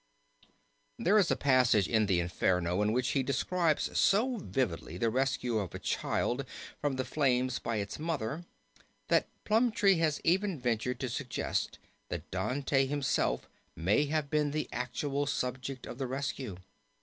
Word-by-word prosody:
There 215 -2 +4
is 185 - +3
a - - +3
passage 125 - +4
in 110 +3 +2
the 95 -3 +3
Inferno 90 +1 +1
in 105 +1 +2
which 125 +2 +1
he 135 - +2
describes 155 +5 0
so 235 +5 +3
vividly 100 - -2
the 115 +3 +1
rescue 125 -2 0
of 95 -4 -4
a - - -2
child - - -1 0.4
from 145 -2 0
the 130 0 -2
flames 130 -2 +1
by 115 - -2
its 100 +3 -3
mother 155 -1 -2 0.7
that - - +3 0.2
Plumptre 220 -2 +4
has 155 -3 +1
even 185 -1 +2
ventured 125 0 -1
to 130 - -1
suggest 125 +1 -2 0.3
that - - -5
Dante 135 0 +1
himself 140 -1 0 0.3
may 100 - +2
have 150 -1 -1
been 150 -1 +2
the 155 +1 -2
actual 140 +3 -2
subject 130 0 -3
of 120 - -8
the 135 - -1
rescue. 130 -6 -3
135 Hz, 150 wpm, -31 LUFS, 115-150 Hz, 0.7 s, There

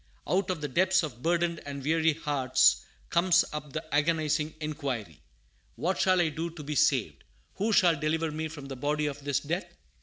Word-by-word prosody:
Out 190 +1 +1
of 180 -5 -2
the 145 - -2
depths 185 +6 +2
of 125 -6 -6
burdened 170 +1 +1
and 140 -1 -6
weary 160 +2 +2
hearts 145 -4 +2 0.3
comes 175 0 +4
up 150 -1 -6
the - - -4
agonizing 155 0 +1
inquiry, 135 - -4 0.5
"What 185 +3 -1
shall 185 -1 +3
I 170 -2 +3
do 165 +2 -4
to 165 -2 -10
be 150 +1 -4
saved?" 145 - +1 0.3
"Who 215 +3 0
shall 175 -7 +4
deliver 160 +1 0
me 160 +1 -3
from 150 -3 -9
the 135 - -6
body 150 +3 -1
of 145 -1 -4
this 140 -2 0
death?" 170 +6 -4
155 Hz, 185 wpm, -28 LUFS, 145-170 Hz, 0.5 s, comes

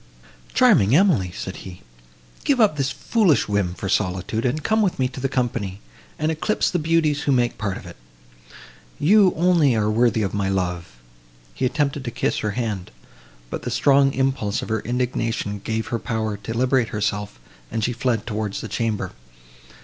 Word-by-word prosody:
"Charming 100 +7 +5
Emily!" 155 - +3
said 95 0 -6
he, 90 -2 -10 0.6
"give 275 -3 +2
up 210 -8 +4
this 140 -2 0
foolish 195 - +2
whim 100 -4 0
for 100 - -5
solitude, 95 +4 -1
and 145 +5 -1
come 220 0 +2
with 195 -4 +1
me 130 - +1
to 130 - -9
the 135 +1 -1
company, 120 -7 -2 0.4
and 155 +1 0
eclipse 160 +7 0
the 180 - 0
beauties 155 -2 +1
who 145 - 0
make 120 -4 +1
part 100 -3 -2
of 115 - -11
it; 85 - -10 1.0
you, 195 +4 +5
only, 165 -6 +3
are 105 -1 +1
worthy 115 -1 +2
of 95 - -2
my 100 -2 0
love." 90 -3 -2 0.7
He 130 - -1
attempted 140 0 -1
to - - -2
kiss 120 +1 -1
her 105 -1 -2
hand, 110 -7 -3 0.6
but - - -4
the - - -4
strong 140 -1 +4
impulse 130 -6 0
of - - -7
her 110 0 0
indignation 115 -3 -2
gave 110 0 -2
her 115 - -1
power 110 -3 -2
to 110 +3 -6
liberate 130 -1 +2
herself, 105 - -2 0.3
and 110 - -2
she 120 - 0
fled 120 -2 -1
towards 105 -3 -3
the - - -5
chamber. 110 0 -2
115 Hz, 180 wpm, -22 LUFS, 105-140 Hz, 1.0 s, Charming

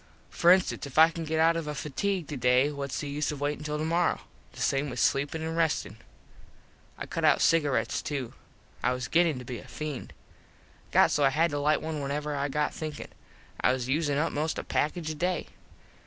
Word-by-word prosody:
For 170 - +3
instance 185 -5 +2
if 140 - -11
I 160 +1 +8
can 165 -1 -5
get 160 +1 -1
out 165 +1 +4
of 165 -2 -3
a 150 - -3
fatigue 175 +4 -2
today 125 0 +2
whats 140 -2 -4
the 145 - -5
use 145 +2 -1
of 150 - -6
waitin 145 +1 -2
till 150 0 -2
tomorrow. 165 +3 +1 0.3
The - - -12
same 140 +1 0
with 125 -1 -5
sleepin 145 +3 +1
and 160 0 -3
restin. 160 -10 0 1.0
I - - -5
cut - - -4
out - - +5
cigarets 140 -8 +2
to. 135 -5 -3 0.5
I 125 - +2
was 125 -1 -4
gettin 165 -4 +3
to 125 - -8
be 120 -1 -5
a - - -13
feend. 150 -4 -6 0.8
Got - - +5
so 145 - +2
I 135 - +6
had 160 +4 +2
to 145 - -1
lite 150 +1 +2
one 155 -2 -3
whenever 145 +2 -2
I 140 0 -1
got 150 +2 -1
thinkin. 155 -2 -6 0.5
I - - +4
was 130 -1 -3
usin 145 0 +1
up 160 +3 +1
most 155 +2 -2
a - - -3
package 155 +1 -1
a - - -3
day. 175 +2 -2
150 Hz, 210 wpm, -28 LUFS, 140-160 Hz, 1.0 s, I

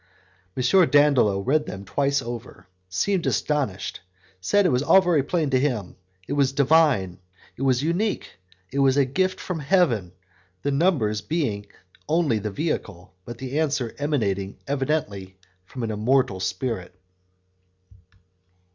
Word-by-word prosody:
M. 130 - 0 0.3
Dandolo 140 -9 +4
read 150 +7 +1
them 95 +1 -7
twice 140 +8 0
over, 120 0 -8 0.2
seemed 190 - 0
astonished, 135 -11 -1 0.4
said 205 - +2
that - - +4
it - - 0
was 125 - +2
all 170 +6 +6
very 175 -6 +2
plain 150 +1 -1
to 130 - +3
him; 120 -9 -2 0.3
it - - -3
was 140 -2 +2
Divine, 140 - +3 0.4
it - - -11
was 130 -1 +2
unique, 175 - -2 0.3
it 140 - -2
was 135 0 +3
a 140 - +4
gift 185 +8 -1
from 180 -3 -4
Heaven, 140 - +1 0.5
the 145 - 0
numbers 140 - +1
being 115 -11 -2 0.4
only 155 -8 +2
the 105 +1 -3
vehicle, 100 - -4
but 120 -1 -8
the 135 +4 -3
answer 145 -7 -1
emanating 100 -10 -1
evidently 135 -10 -2 0.3
from 125 +6 -7
an 110 - -2
immortal 110 -1 +1
spirit. 95 0 -3
135 Hz, 140 wpm, -24 LUFS, 105-150 Hz, 0.5 s, all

